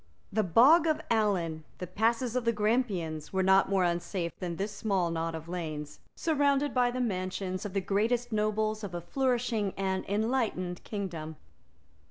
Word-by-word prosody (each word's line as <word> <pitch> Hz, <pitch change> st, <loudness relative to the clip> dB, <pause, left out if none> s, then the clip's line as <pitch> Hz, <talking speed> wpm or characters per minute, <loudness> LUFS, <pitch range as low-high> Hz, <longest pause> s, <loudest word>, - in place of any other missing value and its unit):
The 215 Hz, -, +3 dB
Bog 265 Hz, -, +6 dB
of 310 Hz, -, +2 dB
Allen, 180 Hz, -8 st, +1 dB
the 180 Hz, -, -5 dB
passes 230 Hz, +6 st, 0 dB
of 250 Hz, -, +1 dB
the 230 Hz, -, +3 dB
Grampians, 210 Hz, -8 st, -1 dB
were 190 Hz, 0 st, +1 dB
not 190 Hz, +1 st, +4 dB
more 195 Hz, -2 st, +2 dB
unsafe 175 Hz, 0 st, -1 dB
than 175 Hz, -2 st, -3 dB
this 200 Hz, +4 st, -3 dB
small 195 Hz, -5 st, 0 dB
knot 165 Hz, 0 st, -2 dB
of 160 Hz, 0 st, -7 dB
lanes, 155 Hz, -4 st, -5 dB, 0.2 s
surrounded 285 Hz, -2 st, +1 dB
by 250 Hz, -1 st, +3 dB
the 250 Hz, +1 st, -3 dB
mansions 185 Hz, -3 st, -2 dB
of 190 Hz, -, -10 dB
the 195 Hz, -, +1 dB
greatest 230 Hz, +6 st, 0 dB
nobles 215 Hz, 0 st, 0 dB
of 185 Hz, -4 st, -5 dB
a 175 Hz, -, -3 dB
flourishing 240 Hz, -3 st, 0 dB
and 190 Hz, -1 st, -1 dB
enlightened 210 Hz, -5 st, -1 dB
kingdom. 170 Hz, -7 st, -5 dB
200 Hz, 165 wpm, -30 LUFS, 180-230 Hz, 0.2 s, Bog